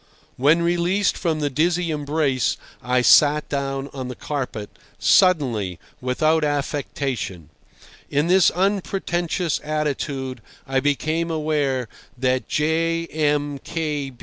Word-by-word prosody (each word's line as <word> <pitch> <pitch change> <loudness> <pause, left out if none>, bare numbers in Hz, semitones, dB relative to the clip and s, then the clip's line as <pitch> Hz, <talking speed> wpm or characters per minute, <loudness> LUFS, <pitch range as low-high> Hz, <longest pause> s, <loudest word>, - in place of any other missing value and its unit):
When 150 +6 +3
released 175 +3 +1
from 160 -3 -1
the 145 -1 0
dizzy 170 +4 +1
embrace, 145 -3 0 0.2
I 125 0 +1
sat 150 +5 +5
down 135 -1 -2
on 130 -2 -5
the 125 - -6
carpet—suddenly, 125 - 0 0.2
without 155 +5 +2
affectation. 135 - -3 0.6
In 145 +2 +1
this 180 0 +5
unpretentious 180 -3 -1
attitude 140 -4 -2 0.2
I 135 0 +1
became 155 +4 0
aware 150 -6 0 0.3
that 130 0 0
J. 165 +2 +1
M. 145 -2 0
150 Hz, 100 wpm, -22 LUFS, 135-165 Hz, 0.6 s, sat